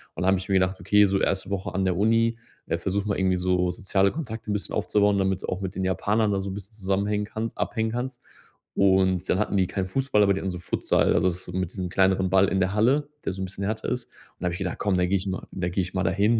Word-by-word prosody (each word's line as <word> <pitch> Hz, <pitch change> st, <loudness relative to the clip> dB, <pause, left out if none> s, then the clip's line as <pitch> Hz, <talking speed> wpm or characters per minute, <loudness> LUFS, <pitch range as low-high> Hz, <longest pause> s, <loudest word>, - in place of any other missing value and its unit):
und -, -, -3 dB
dann -, -, +1 dB
habe 95 Hz, -, +4 dB
ich 95 Hz, -, -9 dB
mir 95 Hz, -, +2 dB
gedacht: 95 Hz, 0 st, +2 dB
„Okay, 105 Hz, +3 st, +5 dB
so 95 Hz, 0 st, +1 dB
erste 95 Hz, 0 st, 0 dB
Woche 100 Hz, 0 st, -3 dB
an 95 Hz, 0 st, 0 dB
der 90 Hz, -2 st, +1 dB
Uni 115 Hz, +2 st, +2 dB, 0.3 s
äh, 85 Hz, -, 0 dB
versuche 100 Hz, +3 st, -2 dB
mal 100 Hz, -, 0 dB
irgendwie 95 Hz, -1 st, +2 dB
so 90 Hz, 0 st, +1 dB
soziale 95 Hz, +2 st, +1 dB
Kontakte 110 Hz, -8 st, -6 dB
'n -, -, +1 dB
bisschen 100 Hz, -5 st, -3 dB
aufzubauen, 105 Hz, -1 st, +2 dB
damit 95 Hz, -1 st, 0 dB
du -, -, -4 dB
auch 90 Hz, +2 st, -3 dB
mit 95 Hz, 0 st, -4 dB
den 95 Hz, 0 st, -1 dB
Japanern 105 Hz, +3 st, +1 dB
da 95 Hz, -, 0 dB
so 100 Hz, -, -4 dB
'n -, -, -5 dB
bisschen 105 Hz, +2 st, -8 dB
zusammenhängen 100 Hz, +1 st, 0 dB
kannst 110 Hz, +2 st, -5 dB
abhängen 110 Hz, 0 st, -1 dB
kannst.“ 125 Hz, +1 st, -4 dB, 0.5 s
Und 95 Hz, -2 st, +3 dB
dann 95 Hz, -, +2 dB
hatten 105 Hz, -, 0 dB
die 95 Hz, -1 st, +2 dB
keinen 95 Hz, 0 st, -2 dB
Fußball, 130 Hz, 0 st, +1 dB
aber 100 Hz, 0 st, +4 dB
die -, -, -3 dB
haben 95 Hz, -, -2 dB
so 90 Hz, -, -6 dB
Futsal 90 Hz, -, +1 dB
also 95 Hz, -, +3 dB
so 90 Hz, +1 st, -7 dB
mit 95 Hz, -1 st, -2 dB
diesem 95 Hz, -2 st, -4 dB
kleineren 95 Hz, 0 st, +2 dB
Ball 95 Hz, +1 st, +4 dB
in 95 Hz, -, 0 dB
der 95 Hz, +1 st, +1 dB
Halle, 135 Hz, +7 st, +2 dB, 0.2 s
der -, -, 0 dB
so 95 Hz, -, -6 dB
'n -, -, -1 dB
bisschen 95 Hz, +1 st, -7 dB
härter 110 Hz, +2 st, -3 dB
ist. 125 Hz, -1 st, -2 dB
Und -, -, -40 dB, 0.3 s
da -, -, -2 dB
habe 85 Hz, -, -1 dB
ich -, -, -4 dB
gedacht: 95 Hz, -3 st, -3 dB
„Komm, 100 Hz, -3 st, +1 dB
da 90 Hz, -, +3 dB
gehe 100 Hz, -, +1 dB
ich 95 Hz, +1 st, -5 dB
mal 95 Hz, -, -4 dB
da 90 Hz, -1 st, -2 dB
gehe 95 Hz, +2 st, 0 dB
ich 95 Hz, -, -7 dB
mal 95 Hz, 0 st, 0 dB
dahin 100 Hz, +6 st, +2 dB
95 Hz, 285 wpm, -25 LUFS, 95-105 Hz, 0.5 s, Okay